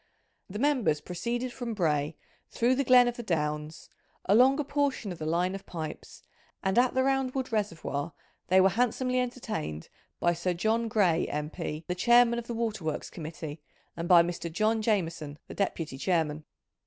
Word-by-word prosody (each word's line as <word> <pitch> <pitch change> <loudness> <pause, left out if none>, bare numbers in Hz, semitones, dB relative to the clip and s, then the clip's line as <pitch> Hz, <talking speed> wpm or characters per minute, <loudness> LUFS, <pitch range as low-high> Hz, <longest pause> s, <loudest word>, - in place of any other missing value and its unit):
The 200 - -6
members 250 - +2
proceeded 235 +10 -3
from 235 -3 -4
Bray 150 -4 0 0.3
through 240 +2 +2
the 275 +2 +1
Glen 250 -1 +6
of 245 - -2
the - - -4
Downs, 150 -5 -3 0.4
along 255 +8 +5
a - - +1
portion 280 -7 -1
of 175 - -8
the 155 - -4
line 175 +3 +1
of 195 - -8
pipes, 160 -3 -7 0.4
and 190 +4 +3
at 250 +1 +2
the 260 - +3
Round 270 -1 0
wood 260 -2 -2
Reservoir 170 -8 -2 0.4
they 185 +1 +5
were 190 +1 +6
handsomely 250 +4 0
entertained 225 - -4 0.3
by 175 - +2
Sir 175 +1 -2
John 225 +6 +1
Gray, 185 -6 +2
M.P., 150 +1 -4
the 180 - -1
Chairman 235 +5 +4
of 235 - -9
the 235 - -4
Waterworks 215 -9 -3
Committee, 155 -2 -7 0.3
and 170 0 -4
by 175 -2 +8
Mr. 170 -1 -4
John 220 +5 +1
Jameson, 165 -9 -1
the - - -8
Deputy 165 -8 -2
Chairman. 155 -3 0
190 Hz, 170 wpm, -29 LUFS, 165-240 Hz, 0.4 s, by